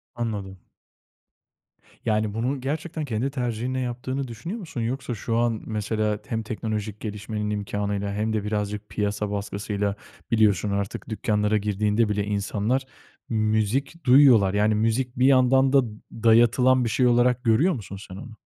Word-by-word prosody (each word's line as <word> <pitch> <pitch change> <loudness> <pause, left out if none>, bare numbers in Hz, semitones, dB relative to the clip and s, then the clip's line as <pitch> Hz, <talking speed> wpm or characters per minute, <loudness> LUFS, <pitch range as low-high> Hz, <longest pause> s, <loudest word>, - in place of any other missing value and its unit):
Anladım. 105 -5 -4 1.5
Yani, 110 -1 +1
bunu 125 +5 -2
gerçekten 155 +3 -3
kendi 120 +1 -1
tercihinle 125 -1 -2
yaptığını 130 +2 -3
düşünüyor 125 - -6
musun? 160 - -6
Yoksa 125 +2 -3
şu 115 +2 -2
an, 115 -2 +1
mesela, 105 -1 -1
hem 115 -1 -2
teknolojik 110 -1 -4
gelişmenin 105 0 -4
imkânıyla 100 -1 -2
hem 110 +2 -1
de 110 -2 -1
birazcık 105 0 -3
piyasa 105 0 -2
baskısıyla, 100 0 -2 0.4
biliyorsun, 105 -3 +3
artık 100 +4 -3
dükkânlara 105 -1 +1
girdiğinde 105 +2 +1
bile 105 -1 0
insanlar 105 +5 -1 0.5
müzik 110 +8 0
duyuyorlar. 125 -7 +6
Yani, 105 +1 +2
müzik 115 +4 0
bir 130 - +4
yandan 130 0 +4
da 140 - +7 0.3
dayatılan 120 +3 +4
bir 115 - 0
şey 125 +4 +2
olarak 125 +1 +3
görüyor 125 +11 +3
musun 100 - -7
sen 95 - -8
onu? 115 +5 -9
110 Hz, 140 wpm, -25 LUFS, 105-125 Hz, 1.5 s, da